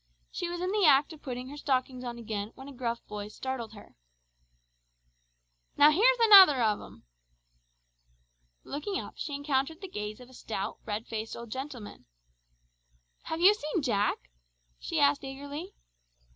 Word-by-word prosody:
She 350 - -4
was 350 0 -5
in 365 +1 -1
the 420 -1 +1
act 285 +2 +4
of 310 - -14
putting 255 -1 -6
her 290 - -9
stockings 260 -3 -1
on 240 -1 -5
again, 215 -2 -5
when 265 - -11
a 280 - -9
gruff 235 -2 -3
voice 210 0 -7
startled 250 -4 -5
her. 205 - -14 1.8
"Now 295 +1 +7
here's 480 +10 +4
another 390 - +9
of 215 -3 +1
'em!" - - -14 1.6
Looking 340 +8 -4
up - - -8
she 290 - -4
encountered 285 +2 -1
the 385 - -7
gaze 210 - -6
of 250 - -13
a 260 - -18
stout, 215 -3 -5
red 215 +1 -4
faced 220 0 -5
old 235 -2 -9
gentleman. 260 -4 -7 1.2
"Have 320 +1 -4
you 385 +4 +8
seen 310 -5 -3
Jack?" 200 - -1 0.5
she - - -2
asked 140 0 +3
eagerly. 285 +7 -7
265 Hz, 155 wpm, -29 LUFS, 225-305 Hz, 1.8 s, another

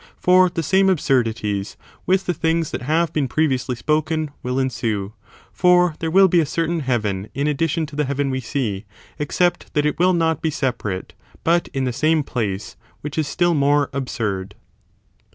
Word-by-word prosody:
for 185 0 +5
the 170 -1 -3
same 190 +5 +3
absurdities 115 - 0 0.3
with 190 +1 +2
the 180 - 0
things 165 0 0
that - - -4
have 160 +6 0
been 145 -3 0
pre 155 +5 +1
viously 130 -2 -2
spoken 155 +1 0
will 125 +1 -2
ensue; 110 -6 -2 0.4
for 180 -1 +4
there 165 - -2
will 190 +3 +6
be 175 -1 +3
a - - +4
certain 165 +2 -1
heaven 110 -8 -1
in 140 +2 -1
addition 160 +2 0
to 150 -1 -11
the 150 0 0
heaven 140 0 -1
we 130 - -1
see, 110 -5 -3 0.3
except 175 +4 0
that 150 0 +2
it 150 - -1
will 185 +1 +4
.not 165 -3 +1
be 160 - 0
separate, 125 -10 -3 0.3
but 170 +1 +2
in 135 - -3
the 125 -2 -1
same 155 +4 +2
place, 105 -6 -3 0.3
which 150 0 -6
is 155 -2 0
still 175 +3 +1
more 145 -1 +2
absurd. 105 -8 -3
145 Hz, 180 wpm, -21 LUFS, 125-165 Hz, 0.4 s, will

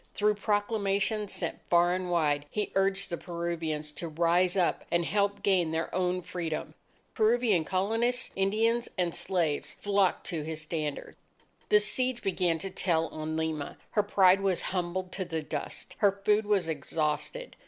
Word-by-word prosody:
Through 210 0 +3
proclamations 205 0 0
sent 170 - -3
far 175 0 +4
and 185 0 -2
wide, 150 -4 +1
he 210 +4 -2
urged 195 0 +1
the 170 - -1
Peruvians 165 -3 -3
to 170 - -4
rise 175 +4 +2
up 180 -2 +1
and 170 0 +1
help 200 +2 0
gain 185 -4 +3
their 160 +1 -2
own 180 0 0
Freedom. 170 -3 -4 0.4
Peruvian 220 -5 +3
Colonists, 225 +7 0
Indians, 225 +5 +1
and 175 -2 0
slaves 160 -5 -1
flocked 200 -2 +1
to 165 -4 -2
his 155 +1 -5
standard. 155 -2 -4 0.5
The 210 - +6
siege 250 +3 0
began 180 -3 +1
to 195 - -4
tell 165 -3 0
on 155 0 -4
Lima. 160 -2 -3
Her 210 - +3
pride 195 -2 +4
was 190 -3 +1
humbled 180 0 -2
to 190 - -2
the 165 -3 -3
dust. 150 -1 -5
Her 205 -2 +5
food 210 0 +3
was 200 -5 +2
exhausted. 155 - -2
180 Hz, 155 wpm, -29 LUFS, 165-205 Hz, 0.5 s, The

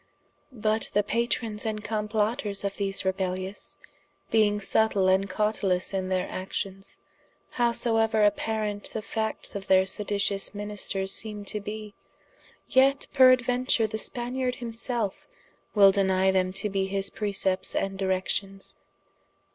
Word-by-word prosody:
But 215 0 0
the 205 - +3
Patrons 225 -1 -1
and 215 -2 -3
complotters 210 0 -1
of 200 0 -3
these 195 -1 -1
rebellious, 190 +1 -2 0.5
being 210 -2 +3
subtile 205 -1 +2
and 190 +1 +3
cautelous 195 -2 0
in 190 -1 -1
their 185 -1 0
actions, 195 +1 -5 0.6
howsoeuer 225 -2 +2
apparant 210 0 -1
the 220 - -3
factes 220 0 -3
of 200 -1 -6
their 190 0 +5
seditious 200 0 -1
ministers 205 -2 -3
seeme 210 -1 -3
to 210 - -2
bee, 210 0 -7 0.7
yet 270 +2 +4
peraduenture 255 -2 +4
the 220 0 -3
Spaniard 250 +2 -1
himself 230 -3 -4 0.5
wil 200 -2 +7
denie 190 -1 +3
them 185 -1 +2
to 195 +2 -1
be 195 -1 -1
his 195 0 -1
precepts, 195 -3 -1
and 195 0 -1
directions. 195 +1 -1
205 Hz, 125 wpm, -27 LUFS, 195-220 Hz, 0.7 s, wil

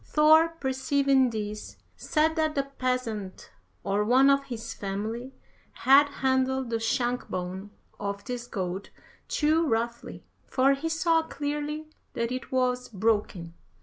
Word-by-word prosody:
Thor 315 +2 +5
perceiving 265 0 +2
this, 210 -2 -6 0.2
said 315 +1 +1
that 315 -1 0
the 275 - +1
peasant, 250 -7 -4 0.3
or 200 +1 +1
one 260 +5 +5
of 275 0 +2
his 230 -3 -6
family, 215 +6 -4 0.4
had 280 +2 +5
handled 260 -2 0
the 230 - 0
shank 240 +2 -1
bone 185 +2 -5 0.3
of 200 0 -4
this 245 -1 -5
goat 190 -2 -4 0.4
too 315 +2 +2
roughly, 235 0 -2 0.2
for 270 +1 +3
he 295 +4 -3
saw 325 0 +2
clearly 295 0 -4 0.3
that 235 +1 -2
it 255 0 -5
was 250 -1 0
broken. 205 -5 -1
255 Hz, 130 wpm, -27 LUFS, 220-280 Hz, 0.4 s, Thor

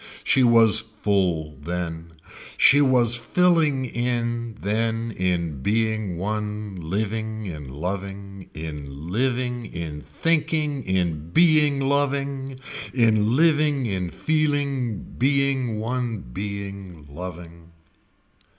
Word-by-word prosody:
She 135 - +3
was 115 -3 +6
full 95 - -1
then, 85 0 -4 0.4
she 145 +1 +6
was 125 -4 +4
filling 150 +1 +2
in 120 -2 -2
then 115 +2 -1
in 85 -7 -1
being 110 -1 0
one 105 +1 -3
living 110 +5 -3
in 75 -7 -7
loving, 95 +5 -6
in 75 -1 -7
living 125 +2 -1
in 80 -5 -6
thinking 155 - 0
in 85 -4 -1
being 150 - +4
loving, 140 -1 -1 0.4
in 110 -2 +3
living 150 -3 +3
in 95 -5 -2
feeling 140 - 0 0.2
being 135 -4 +2
one 120 -1 -2
being 100 -3 -6
loving. 85 +1 -9
110 Hz, 95 wpm, -24 LUFS, 90-130 Hz, 0.4 s, was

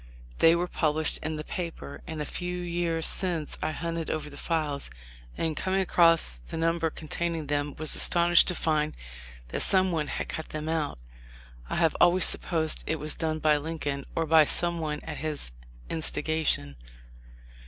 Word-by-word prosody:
They 165 +1 +6
were 175 +1 0
published 155 -2 +1
in 155 +1 -3
the 155 - -5
paper, 165 -4 -6
and 155 -2 -4
a - - -6
few 180 +3 -4
years 170 -2 0
since 175 -5 +1
I - - 0
hunted 165 +1 -3
over 150 -1 -3
the - - -10
files, 150 - -2 0.5
and 160 -1 -1
coming 190 +3 0
across 165 - +4
the - - -5
number 165 0 +1
containing 165 +1 -3
them, 145 0 -1
was 155 0 0
astonished 175 -1 +5
to 180 - +2
find 155 -2 0 0.5
that - - -2
some 185 -1 +3
one 155 -3 -1
had - - -3
cut 160 - -5
them 155 0 -5
out. 160 -2 -1 0.7
I - - -2
have 165 -2 +2
always 175 +1 +6
supposed 160 -3 0
it 160 - +1
was 150 +1 -3
done 160 -1 -1
by 155 -1 +3
Lincoln 145 -2 -4
or 165 - +1
by 160 0 +6
some 170 +3 +3
one 150 -2 -3
at - - -6
his 150 - -4 0.4
instigation. 155 - -1
160 Hz, 170 wpm, -28 LUFS, 150-170 Hz, 0.7 s, They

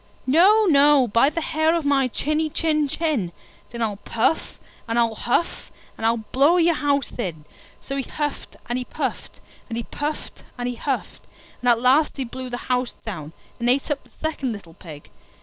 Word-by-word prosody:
"No, 385 +11 +5
no, 285 -5 +5
by 230 +6 +4
the 330 +2 -3
hair 315 +1 +1
of 330 -3 -1
my 275 -2 +3
chinny 305 +5 0
chin 305 -1 +1
chin." 280 - -1 0.4
"Then 235 -1 -3
I'll 210 -3 -1
puff 230 +9 0 0.3
and 230 +1 -1
I'll 230 -1 +3
huff, 245 +9 -1 0.3
and 225 - 0
I'll 230 -1 +1
blow 285 +7 +5
your 340 -1 +4
house 285 -2 0
in!" 160 -9 -4 0.4
So 275 - -5
he - - +1
huffed 295 +2 -4
and 240 +1 -1
he - - -3
puffed, - - -5 0.3
and 230 - -3
he 235 - -2
puffed 295 +5 -5 0.2
and 245 0 -2
he 245 - -2
huffed, 265 +2 -4 0.3
and 245 - +2
at 235 -1 +5
last 270 +6 +3
he 270 - -1
blew 255 +1 -7
the 245 - -3
house 250 -1 0
down, 165 -8 -6 0.3
and 240 +1 +1
ate 270 +4 +2
up 290 - -2
the - - -23
second 300 -5 -3
little 185 -6 -11
Pig. 155 -4 -12
260 Hz, 190 wpm, -23 LUFS, 235-300 Hz, 0.4 s, No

